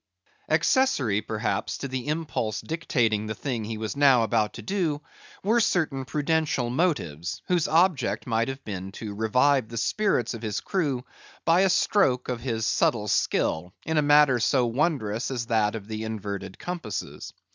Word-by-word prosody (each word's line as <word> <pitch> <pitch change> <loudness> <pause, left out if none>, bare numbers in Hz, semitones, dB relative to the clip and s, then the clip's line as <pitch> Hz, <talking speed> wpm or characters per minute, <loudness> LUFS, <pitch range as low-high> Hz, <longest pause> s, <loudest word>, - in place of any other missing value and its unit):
Accessory, 140 - +2
perhaps, 110 +1 -2
to 140 - -4
the 130 0 -4
impulse 150 -8 -2
dictating 115 -10 0
the 110 - -3
thing 120 -4 -3
he 110 +1 -4
was 110 +2 -4
now 135 -4 +5
about 110 -2 +1
to - - -9
do, 175 -7 -1 0.4
were 220 +5 +3
certain 160 - +1
prudential 150 -4 0
motives, 85 - -1
whose 175 -3 +2
object 155 - +2
might 115 0 0
have 135 0 -6
been 95 -2 -6
to 105 -1 -6
revive 125 +4 +2
the 115 - -6
spirits 125 - +1
of 115 - -7
his 105 -3 -2
crew 145 -10 -1 0.4
by 165 +2 +5
a 195 - +4
stroke 160 -9 +2
of 125 -2 -3
his 115 -3 -2
subtile 105 -3 +1
skill, 90 0 0
in 160 -1 +1
a - - +4
matter 145 -3 +5
so 125 +2 +2
wondrous 120 -4 0
as 125 -3 -3
that 110 -2 +1
of 105 -2 -7
the 110 0 -4
inverted 100 -3 -5
compasses. 175 - -5
125 Hz, 165 wpm, -26 LUFS, 110-150 Hz, 0.4 s, now